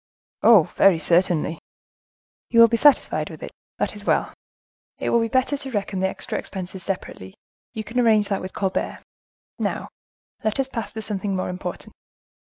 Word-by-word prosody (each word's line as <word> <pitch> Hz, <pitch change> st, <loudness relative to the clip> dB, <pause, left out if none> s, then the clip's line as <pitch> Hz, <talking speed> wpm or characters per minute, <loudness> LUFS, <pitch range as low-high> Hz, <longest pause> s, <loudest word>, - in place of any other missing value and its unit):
"Oh! 220 Hz, -7 st, +7 dB
very 195 Hz, +2 st, +3 dB
certainly." 170 Hz, -1 st, +2 dB, 0.9 s
"You 230 Hz, -, +3 dB
will 230 Hz, -, +10 dB
be 230 Hz, -, 0 dB
satisfied 285 Hz, +4 st, +3 dB
with -, -, -10 dB
it? -, -, -7 dB, 0.3 s
That -, -, -1 dB
is -, -, -8 dB
well. -, -, +1 dB, 0.6 s
It -, -, -2 dB
will 235 Hz, -, +4 dB
be 230 Hz, -, 0 dB
better 260 Hz, +4 st, +1 dB
to 275 Hz, -1 st, -4 dB
reckon 200 Hz, -4 st, -2 dB
the 190 Hz, -, +2 dB
extra -, -, -4 dB
expenses 190 Hz, -1 st, -7 dB
separately; 170 Hz, -, -6 dB, 0.4 s
you 220 Hz, -, -3 dB
can 230 Hz, +4 st, -3 dB
arrange 220 Hz, -4 st, +4 dB
that 195 Hz, -, -1 dB
with 185 Hz, -, -6 dB
Colbert. 190 Hz, -2 st, -2 dB, 0.6 s
Now -, -, -2 dB, 0.5 s
let 215 Hz, +4 st, -1 dB
us 270 Hz, -, +1 dB
pass 230 Hz, -4 st, -5 dB
to 220 Hz, -1 st, -4 dB
something 200 Hz, -2 st, -2 dB
more 185 Hz, -, -2 dB
important." 180 Hz, 0 st, -6 dB
205 Hz, 175 wpm, -23 LUFS, 185-230 Hz, 0.9 s, will